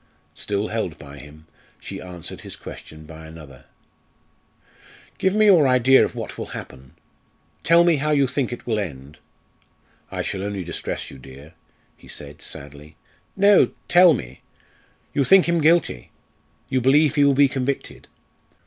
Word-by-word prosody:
Still 105 +1 -3
held 100 -8 -3
by 70 -1 -12
him, 75 +2 -15 0.3
she - - -8
answered 90 -2 -8
his - - -7
question 80 0 -11
by 80 0 -12
another: 75 -5 -14 1.5
"Give 190 +1 +1
me 215 0 +4
your 175 -9 +6
idea 130 +1 +5
of - - -3
what - - -7
will - - -5
happen. 65 -2 -12 0.7
Tell 170 +1 +5
me 170 -3 +3
how 150 +2 -2
you 145 -2 +3
think 130 -1 -1
it 120 - -8
will 110 -3 -1
end." 75 -5 -7 0.9
"I - - -4
shall 95 - -4
only 100 -1 -4
distress 85 -1 -5
you, 65 - -12
dear," 70 +4 -14 0.4
he - - -19
said - - -7
sadly. 75 +2 -9 0.4
"No; 200 0 +5 0.2
tell 175 -3 +6
me. 65 - -9 0.7
You 140 - +1
think 190 +5 +5
him 170 -1 +1
guilty. 155 - +1 0.6
You 130 - -1
believe 140 +3 +3
he 145 - +3
will 140 -1 +4
be 140 +1 +5
convicted." 135 +1 -4
115 Hz, 155 wpm, -22 LUFS, -, 1.5 s, your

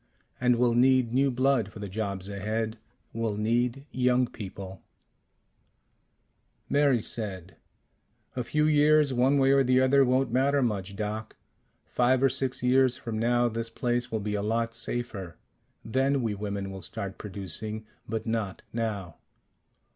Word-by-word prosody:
And 125 0 +3
we'll 120 0 +2
need 125 -1 +3
new 135 +2 +3
blood 130 -4 +1
for - - -11
the 105 -1 -5
jobs 100 -1 -4
ahead. 110 +3 -3 0.3
We'll 115 -2 -2
need 120 +5 0
young 125 0 +2
people 95 -5 -8 1.3
" - - -45
Mary 140 -4 +4
said, 95 -6 -4 0.8
"A 125 - -1
few 150 +5 +1
years 150 -1 +4
one 130 +3 +3
way 135 0 +4
or 135 0 +5
the 130 0 +3
other 135 +1 +5
won't 130 -1 +1
matter 135 +2 +2
much, 100 -4 -2
Doc. 110 +1 -4 0.5
Five 125 +1 +2
or 135 - +6
six 130 -1 -2
years 130 0 +4
from 110 -2 -4
now 120 +1 +2
this 115 0 -3
place 120 +1 -1
will 110 - -1
be 105 +1 -3
a 105 - -1
lot 115 +2 -1
safer. 100 -11 -4 0.5
Then 135 +3 +1
we 110 -2 0
women 100 -1 -4
will 95 0 -8
start 100 +1 -5
producing. 105 +2 -5 0.2
But 110 -1 -3
not 110 -4 -3
now." 105 -6 -3
115 Hz, 150 wpm, -28 LUFS, 105-130 Hz, 1.3 s, or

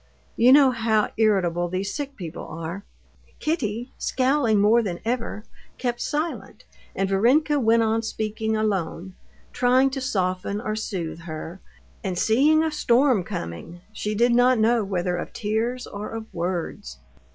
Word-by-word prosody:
You 240 +3 +5
know 275 -1 +7
how 225 -3 +1
irritable 180 -6 +2
these 190 +2 -3
sick 280 -2 -5
people 170 -7 -7
are." 165 +4 -6 0.5
Kitty, 245 -6 -2
scowling 255 -5 +2
more 215 +4 +5
than 185 -6 -4
ever, 230 -2 -2 0.3
kept 240 -1 -2
silent, 310 +3 -3 0.3
and 195 - 0
Varenka 265 +10 +3
went 230 -2 +3
on 225 0 +1
speaking 220 0 -2
alone, 190 -4 -2 0.4
trying 255 +2 +3
to 270 0 -4
soften 190 -4 -1
or 215 -1 -3
soothe 180 -7 -4
her, 160 +2 -7 0.4
and 185 -2 -3
seeing 285 - +4
a 320 - 0
storm 255 -6 +3
coming—she 175 - -6
did 240 +3 +3
not 245 +1 +4
know 225 +1 +3
whether 180 -2 -1
of 175 - -6
tears 230 +4 -2
or 205 +1 -7
of 225 0 -8
words. 170 - -4
220 Hz, 140 wpm, -24 LUFS, 185-245 Hz, 0.5 s, know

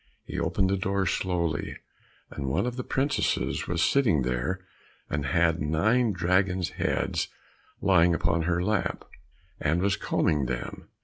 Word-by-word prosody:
He - - -4
opened 95 -1 +1
the 100 - +2
door 95 +1 0
slowly, 85 -4 -1 0.5
and 70 - -5
one 70 - +1
of 125 -1 -2
the 125 - -4
princesses 135 +3 0
was 85 -1 +1
sitting 105 - +3
there, 65 +10 -1 0.5
and 75 -2 -1
had 85 +3 +2
nine 110 +11 +2
dragon's 90 0 +1
heads - - -1 0.5
lying 90 -3 +4
upon 85 0 +1
her 85 0 +1
lap, 105 0 -1 0.5
and 80 +4 +1
was 95 +1 +1
combing 75 -5 +1
them. - - -5
90 Hz, 140 wpm, -27 LUFS, 80-100 Hz, 0.5 s, lying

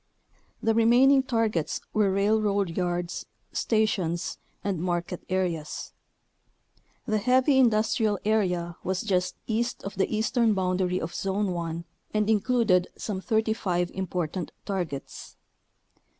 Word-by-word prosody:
The 225 - +3
remaining 245 +5 +5
tar 230 -4 +1
gets 165 -7 -2
were 210 -2 +3
railroad 200 -2 +1
yards, 175 -1 -2 0.3
stations, 190 -6 0 0.2
and 195 -4 -1
market 175 0 -2
areas. 175 -5 -2 1.1
The 215 -3 +1
heavy 260 +4 +4
industrial 220 -3 +3
area 180 -6 +1
was 190 0 -1
just 180 -4 0
east 235 +2 -1
of 200 - -5
the 195 - +1
eastern 220 0 +2
boundary 185 -1 0
of 165 - -5
Zone 195 0 -1
1 170 -1 -3 0.3
and 210 +1 +2
included 210 -5 +3
some 195 -3 -4
35 215 -5 0
important 180 -2 -3
targets. 175 -9 -5
195 Hz, 115 wpm, -27 LUFS, 180-220 Hz, 1.1 s, remaining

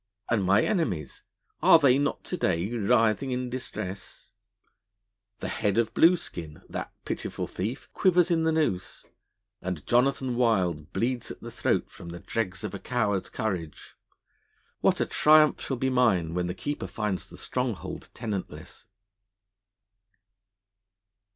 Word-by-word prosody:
And 110 -4 +2
my 95 +2 +4
enemies 95 - -1 0.4
are - - +8
they 140 -4 +4
not 145 - -1
to - - -4
day 95 - 0
writhing 115 +3 +2
in 125 -1 -2
distress? 105 -6 -6 1.1
The - - -2
head 105 -2 0
of 115 -1 +1
Blueskin, 90 - +2
that - - -5
pitiful - - -3
thief, 110 +9 -4
quivers 180 -1 +3
in 165 -1 +3
the 160 0 +2
noose; 150 - -1 0.6
and 90 -4 -4
Jonathan 130 0 +2
Wild 95 -11 +1
bleeds 120 +4 -1
at - - -9
the - - -8
throat - - 0
from 85 - -10
the 85 +1 -7
dregs 95 -1 -3
of 105 - -4
a 100 - -5
coward's 105 -6 -1
courage. 95 -9 -4 0.8
What - - +2
a - - +2
triumph 155 0 +5
shall 135 - -2
be 130 +2 0
mine 100 -11 +2
when 90 0 -1
the 90 - -4
Keeper 145 +11 -4
finds 105 -4 -3
the - - -13
stronghold 125 -6 -3
tenantless!' 105 -6 -6
115 Hz, 140 wpm, -27 LUFS, 95-130 Hz, 1.1 s, are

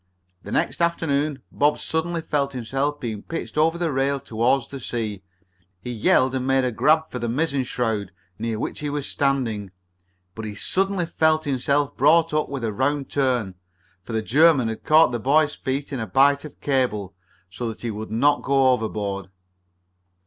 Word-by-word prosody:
The - - -9
next - - 0
afternoon 150 -5 0
Bob 145 +1 +2
suddenly 165 +1 -2
felt 140 -3 -1
himself 135 +4 -2
being 110 -4 -4
pitched 165 - -6
over 160 +2 +2
the 170 -2 -1
rail 135 +1 0
toward 120 +2 0
the 135 - -6
sea. 110 -5 -4 0.6
He 125 +6 -6
yelled 130 +3 +3
and 130 -1 -2
made 135 0 +3
a 125 - 0
grab 155 +7 +2
for 125 - -4
the 120 0 -2
mizzen 140 +1 0
shroud 110 -6 -2 0.3
near 115 0 -2
which - - -4
he 150 - -3
was 145 -1 -3
standing, 125 -8 -1 0.6
but 110 - -7
he 105 -1 -5
suddenly 195 - 0
found 160 -1 +2
himself 140 0 0
brought 160 +3 +4
up 155 0 0
with 140 -3 -5
a 110 -2 -1
round 135 +4 -1
turn, 125 -8 0 0.5
for 115 - -8
the 110 -1 0
German 140 0 +4
had 110 - -6
caught 155 -3 +5
the 120 - -2
boy's 145 +4 +3
feet 140 +2 -4
in 135 - -2
a 110 - -3
bight 140 +7 +4
of 150 - -11
cable, 120 -9 0 0.4
so 110 +6 -4
that 110 - -8
he 115 - -2
would 110 +1 -6
not 140 +7 +2
go 135 -1 +3
overboard. 100 -5 -2
135 Hz, 180 wpm, -23 LUFS, 115-150 Hz, 0.6 s, caught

